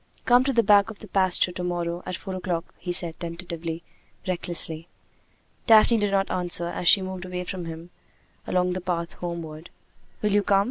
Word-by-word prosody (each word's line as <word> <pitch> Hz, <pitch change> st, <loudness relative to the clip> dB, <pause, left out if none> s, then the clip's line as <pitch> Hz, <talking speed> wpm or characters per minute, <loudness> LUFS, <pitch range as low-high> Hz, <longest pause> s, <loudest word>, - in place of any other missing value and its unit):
"Come 245 Hz, +1 st, +6 dB
to 275 Hz, -, +2 dB
the 230 Hz, -3 st, +3 dB
back 205 Hz, +1 st, +5 dB
of 220 Hz, -, -8 dB
the 215 Hz, -, -12 dB
pasture 185 Hz, -1 st, +3 dB
to 180 Hz, 0 st, -5 dB
morrow! 175 Hz, -1 st, -2 dB
at 185 Hz, -, -2 dB
four 190 Hz, +2 st, -7 dB
o'clock!" 180 Hz, -2 st, -3 dB
he 180 Hz, -, -4 dB
said, 170 Hz, -2 st, +1 dB
tentatively, 170 Hz, -1 st, -5 dB, 0.4 s
recklessly. 170 Hz, -2 st, -3 dB, 0.8 s
Daphne 225 Hz, +1 st, +7 dB
did 205 Hz, -1 st, +1 dB
not 195 Hz, 0 st, +1 dB
answer 175 Hz, -1 st, 0 dB
as 175 Hz, 0 st, -4 dB
she 195 Hz, +1 st, +7 dB
moved 185 Hz, -1 st, -5 dB
away 180 Hz, -1 st, -4 dB
from 180 Hz, -1 st, -5 dB
him 165 Hz, +1 st, -8 dB, 0.6 s
along 180 Hz, 0 st, +1 dB
the 185 Hz, -, -4 dB
path 170 Hz, -2 st, -2 dB
homeward. 170 Hz, -2 st, -6 dB, 0.5 s
"Will 210 Hz, -, +2 dB
you 205 Hz, +1 st, +4 dB
come?" 200 Hz, 0 st, +3 dB
180 Hz, 185 wpm, -25 LUFS, 170-195 Hz, 0.8 s, Daphne